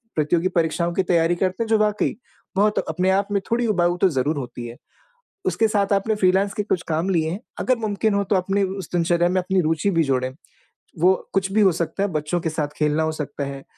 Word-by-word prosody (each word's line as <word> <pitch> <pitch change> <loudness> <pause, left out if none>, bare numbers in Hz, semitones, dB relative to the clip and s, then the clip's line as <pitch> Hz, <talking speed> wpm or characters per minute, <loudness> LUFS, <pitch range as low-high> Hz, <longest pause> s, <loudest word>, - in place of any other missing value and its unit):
प्रतियोगी 165 +3 +1
परीक्षाओं 170 +1 +1
की 190 - +1
तैयारी 170 -1 +2
करते 185 +5 -1
हैं - - -6
जो 220 0 +3
वाक़ई 210 -1 +1 0.4
बहुत 210 +2 +2
अपने 180 +4 0
आप 195 +1 +1
में 200 -1 +1
थोड़ी 235 0 +1
उबाऊ 175 -4 +1
तो 190 - +5
ज़रूर 145 0 0
होती 120 -2 -6
है। 115 - -9 0.7
उसके 225 - +2
साथ 205 -1 +1
आपने 200 +2 +1
फ्रीलांस 195 0 +2
के 210 - -1
कुछ 185 -4 -1
काम 165 +3 0
लिए 160 -3 +1
हैं 185 +5 -4 0.2
अगर 255 - +2
मुमकिन 215 -1 0
हो 200 0 +1
तो 195 - +5
अपने 195 +2 0
उस 190 -2 -5
दिनचर्या 175 0 +2
में 185 +1 +1
अपनी 185 +1 +1
रुचि 160 +3 +1
भी 165 -3 +2
जोड़ें। 130 -2 0 0.7
वो 185 +3 +5 0.2
कुछ 195 0 0
भी 215 - +3
हो 190 - +5
सकता 170 +3 -2
है, 200 - +1
बच्चों 155 0 -2
के 165 - -2
साथ 155 -2 -2
खेलना 150 +1 +1
हो 160 0 0
सकता 145 -2 -4
है, 140 0 -7
180 Hz, 225 wpm, -22 LUFS, 160-200 Hz, 0.7 s, तो